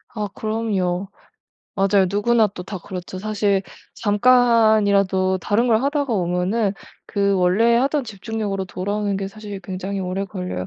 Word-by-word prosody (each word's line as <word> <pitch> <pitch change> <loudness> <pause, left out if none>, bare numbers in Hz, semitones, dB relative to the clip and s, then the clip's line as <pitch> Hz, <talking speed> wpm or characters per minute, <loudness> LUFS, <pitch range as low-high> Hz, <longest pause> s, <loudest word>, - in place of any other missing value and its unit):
아 210 -2 -2
그럼요. 200 -4 -1 0.7
맞아요. 195 -1 +3
누구나 220 +2 +3
또 180 -2 -8
다 190 +1 -6
그렇죠. 180 +1 -7
사실 205 -1 0 0.3
잠깐이라도 205 -4 +3
다른 210 +7 +1
걸 225 0 +3
하다가 285 -2 0
오면은 190 +3 0 0.3
그 200 -1 +1
원래 195 +6 +3
하던 275 +3 +1
집중력으로 210 -2 -4
돌아오는 200 +2 -2
게 195 0 -3
사실 205 -1 -8
굉장히 190 +1 -5
오래 185 +2 -2
걸려요. 180 - -5
200 Hz, 315 characters per minute, -21 LUFS, 190-220 Hz, 0.7 s, 맞아요